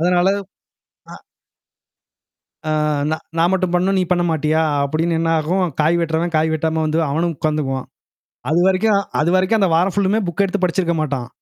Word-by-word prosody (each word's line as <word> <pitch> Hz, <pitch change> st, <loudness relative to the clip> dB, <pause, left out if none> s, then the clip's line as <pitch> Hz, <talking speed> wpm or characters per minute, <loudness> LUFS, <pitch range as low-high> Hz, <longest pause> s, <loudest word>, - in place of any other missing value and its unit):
அதனால. 180 Hz, +2 st, +2 dB, 0.8 s
அ. -, -, -9 dB, 1.5 s
அ -, -, -1 dB, 0.4 s
"ந -, -, +2 dB, 0.2 s
நான் 170 Hz, +2 st, +3 dB
மட்டும் 185 Hz, -2 st, 0 dB
பண்ணணும். 185 Hz, +2 st, +1 dB
நீ -, -, +2 dB
பண்ண 175 Hz, -1 st, +2 dB
மாட்டியா?" 155 Hz, 0 st, +1 dB, 0.2 s
அப்டின்னு 160 Hz, +4 st, -1 dB
என்னாகும். 165 Hz, +3 st, +1 dB
காய் 160 Hz, +3 st, +3 dB
வெட்டுறவன் 165 Hz, +1 st, -1 dB
காய் 155 Hz, +1 st, +2 dB
வெட்டாம 160 Hz, 0 st, -1 dB
வந்து 155 Hz, +1 st, -1 dB
அவனும் 165 Hz, +4 st, -1 dB
உட்காந்துக்குவான். 145 Hz, -3 st, -2 dB, 0.6 s
அதுவரைக்கும் 190 Hz, +5 st, +2 dB, 0.2 s
அதுவரைக்கும் 185 Hz, +6 st, +2 dB
அந்த 195 Hz, -3 st, +2 dB
வாரம் 180 Hz, +3 st, +1 dB
ஃபுல்லுமே 200 Hz, +2 st, +1 dB
புக் 175 Hz, +3 st, -1 dB
எடுத்து 195 Hz, 0 st, -3 dB
படிச்சிருக்க 175 Hz, -1 st, 0 dB
மாட்டான். 140 Hz, -5 st, -3 dB
170 Hz, 145 wpm, -19 LUFS, 155-185 Hz, 1.5 s, நான்